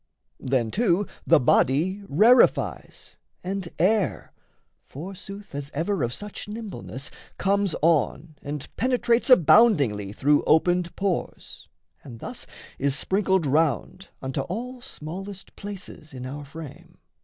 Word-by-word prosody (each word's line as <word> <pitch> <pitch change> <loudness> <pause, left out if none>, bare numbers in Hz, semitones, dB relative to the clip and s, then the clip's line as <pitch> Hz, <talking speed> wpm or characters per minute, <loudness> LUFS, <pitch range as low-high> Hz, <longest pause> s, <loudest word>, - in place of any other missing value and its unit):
Then 125 -4 0
too 205 -3 +2 0.2
the - - +6
body 155 +9 +2
rarefies, 225 - +3 0.3
and 185 -1 -4
air, 180 - +1 0.5
Forsooth 195 +5 -9
as 140 0 -5
ever 170 +3 -1
of 120 -1 0
such 205 +10 -6
nimbleness, 210 - -6 0.3
Comes 200 -2 +1
on 155 0 +1
and 145 0 -5
penetrates 245 0 +2
aboundingly 155 - +5
Through 145 +7 +3
opened 175 +2 +2
pores, 195 -3 -3 0.4
and 120 -5 -10
thus - - -6 0.3
is 140 0 +1
sprinkled 190 -2 +1
round 160 +6 0
Unto 130 +1 -2
all 240 - -5
smallest 195 - -8
places 195 -7 -9
in 125 0 -6
our 145 +3 -6
frame. 150 +1 -11
170 Hz, 115 wpm, -25 LUFS, 140-200 Hz, 0.5 s, the